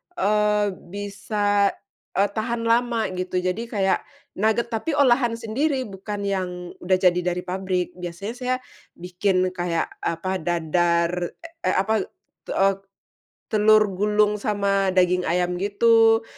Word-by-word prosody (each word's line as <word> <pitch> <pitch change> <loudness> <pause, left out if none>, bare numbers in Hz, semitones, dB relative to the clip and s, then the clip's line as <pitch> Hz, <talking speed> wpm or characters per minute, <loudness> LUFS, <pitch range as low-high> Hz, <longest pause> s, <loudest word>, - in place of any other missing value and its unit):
eee, 210 - +2 0.2
bisa, 205 +1 0 0.5
eee, 200 +1 +3
tahan 230 +2 -2
lama 230 -1 +1
gitu 185 0 -2
jadi 185 +5 -1
kayak, 195 -4 +1 0.3
nuget 220 +3 0
tapi 230 +8 -1
olahan 245 -4 +3
sendiri 260 +5 -1
bukan 205 0 -6
yang 180 -3 -3
udah 185 +1 +2
jadi 180 -1 +3
dari 180 0 -2
pabrik 185 -1 -2
biasanya 180 +4 -5
saya, 255 0 0 0.4
bikin 185 +1 0
kaya 175 -2 -1 0.2
apa 185 +3 -2
dadar, 170 +1 +1 0.6
eh, - - +2
apa, 215 +3 +1 0.4
eee, 195 0 +2 0.8
telur 215 -1 +5
gulung 210 +2 +1
sama 200 -2 +1
daging 180 0 +4
ayam 180 +1 0
gitu, 225 +2 +4
200 Hz, 120 wpm, -23 LUFS, 180-220 Hz, 0.8 s, telur